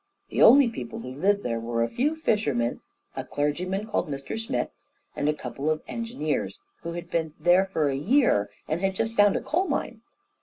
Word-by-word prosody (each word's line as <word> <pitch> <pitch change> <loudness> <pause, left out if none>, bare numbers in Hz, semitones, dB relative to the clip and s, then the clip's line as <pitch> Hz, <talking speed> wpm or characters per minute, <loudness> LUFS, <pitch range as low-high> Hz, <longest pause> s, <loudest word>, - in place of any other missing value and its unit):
The - - -1
only 275 +2 +8
people 125 - -6
who 125 - -7
lived 200 +8 +1
there 115 -1 -1
were 115 0 -1
a - - +1
few 280 - 0
fishermen, 145 - 0 0.3
a - - -3
clergyman 180 +8 -2
called 215 -7 -1
Mr 140 -1 -4
Smith, 225 - -2 0.4
and 145 - 0
a - - +2
couple 150 0 -4
of 155 0 -1
engineers, 230 - -3 0.2
who 170 - -5
had 175 0 -7
been 160 -2 -1
there 175 +4 +5
for 160 -6 0
a 135 - 0
year 165 - +3 0.2
and 155 +3 -1
had 195 -1 0
just 225 +3 -1
found 205 -2 +5
a - - 0
coal 365 +5 0
mine. 240 -6 -3
175 Hz, 195 wpm, -26 LUFS, 145-225 Hz, 0.4 s, only